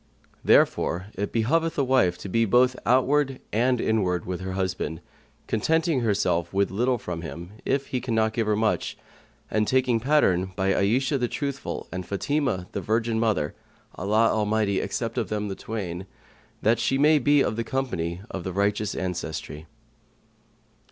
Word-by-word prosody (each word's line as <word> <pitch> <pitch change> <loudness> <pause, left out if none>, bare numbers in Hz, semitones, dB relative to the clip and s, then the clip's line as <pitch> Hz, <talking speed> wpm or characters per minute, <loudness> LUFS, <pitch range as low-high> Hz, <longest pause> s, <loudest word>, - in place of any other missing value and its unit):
Therefore 90 +4 +3
it 100 +2 -3
behoveth 160 +9 +1
a 140 - +3
wife 125 -10 +3
to - - -8
be 115 +5 +2
both 125 +3 +4
outward 135 +2 +3
and 125 +3 +2
inward 95 -6 0
with 90 0 -4
her 95 0 -4
husband; 95 -4 -2 0.5
contenting 160 +6 +1
herself 95 -7 0
with 100 +1 +1
little 125 +5 +1
from 90 -6 -5
him, 85 +2 -8
if 140 +1 0
he 125 - -2
cannot 110 -3 +1
give 115 -1 -1
her 105 - +2
much, 110 0 0 0.5
and 110 -1 +1
taking 130 -3 +2
pattern 95 -9 +2
by 95 0 +1
Ayishah 130 +8 +1
the 120 - +1
Truthful 140 +1 -4
and 90 +1 -4
Fatimah 110 - -1
the - - -3
virgin 110 +1 0
mother 110 -10 0 0.4
(Allah 110 +5 +2
Almighty 105 -2 +1
accept 115 +1 -2
of 110 -6 -2
them 105 -1 -2
the 95 - -4
twain!), 95 -5 -5 0.6
that 115 +2 +3
she 135 - +1
may 150 +2 +5
be 145 +1 +4
of - - -1
the 115 - -1
company 95 -11 -2
of 95 - -5
the 95 - -4
righteous 100 +1 0
ancestry. 80 -4 -4
110 Hz, 160 wpm, -25 LUFS, 95-125 Hz, 0.6 s, may